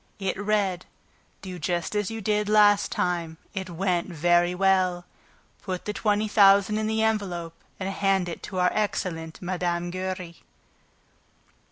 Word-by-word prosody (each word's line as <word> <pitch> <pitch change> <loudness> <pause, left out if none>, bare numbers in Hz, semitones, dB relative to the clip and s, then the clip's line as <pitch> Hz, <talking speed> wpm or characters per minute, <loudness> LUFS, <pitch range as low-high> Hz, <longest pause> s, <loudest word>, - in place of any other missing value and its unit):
It 195 -2 -2
read: 200 -3 -1 0.6
Do 185 -2 -7
just 175 +4 -2
as 210 -2 0
you 225 0 -5
did 210 0 0
last 205 -1 +5
time. 170 -2 -1 0.2
It 190 -1 -4
went 175 0 -1
very 175 +1 +2
well. 185 -2 +2 0.6
Put 185 -2 -5
the 210 - -2
twenty 210 0 +1
thousand 200 0 +5
in 215 - -1
the 220 0 0
envelope 185 -7 -1 0.3
and 190 - -3
hand 195 -1 +1
it 170 - -6
to 190 - -6
our 180 0 +3
excellent 170 -6 -2
Mme. 175 -1 -2
Giry. 185 -2 -5
185 Hz, 145 wpm, -26 LUFS, 175-205 Hz, 0.6 s, last